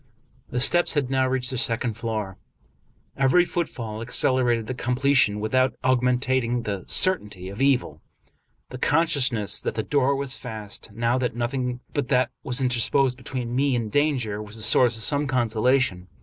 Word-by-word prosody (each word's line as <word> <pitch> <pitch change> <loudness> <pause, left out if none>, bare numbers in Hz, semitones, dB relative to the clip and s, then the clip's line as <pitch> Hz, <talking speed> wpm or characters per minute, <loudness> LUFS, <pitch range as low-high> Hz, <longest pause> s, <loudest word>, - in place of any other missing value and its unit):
The 125 - -2
steps 170 +7 +3
had 135 -3 0
now 130 -1 +2
reached 130 0 -1
the 130 - -1
second 115 -1 0
floor. 105 -4 -5 0.8
Every 135 +7 +3
foot 175 -1 -2
fall 110 -2 -7
accelerated 120 -1 +1
the 130 - -4
completion 125 -3 +2
without 130 +5 +1
augmenting 125 -1 +1
the 100 -4 -4
cer 185 -1 +4
tainty 95 -3 -10
of 100 - -7
evil. 135 -2 +1 0.7
The 130 - -8
consciousness 130 -9 +1
that - - -3
the - - -2
door 140 -1 +1
was 135 -1 -3
fast, 110 -3 -8
now 120 +4 0
that 125 -2 -2
nothing 125 +1 -3
but 145 -3 -2
that 125 -2 +1
was 135 -2 -1
interposed 125 +1 +2
between 125 -1 -5
me 135 0 +1
and 115 -3 -3
danger, 125 -8 0
was 105 +1 -6
a 110 - -4
source 115 +2 +3
of 110 - -3
some 145 +2 +1
consolation. 120 -5 +1
125 Hz, 165 wpm, -24 LUFS, 115-135 Hz, 0.8 s, cer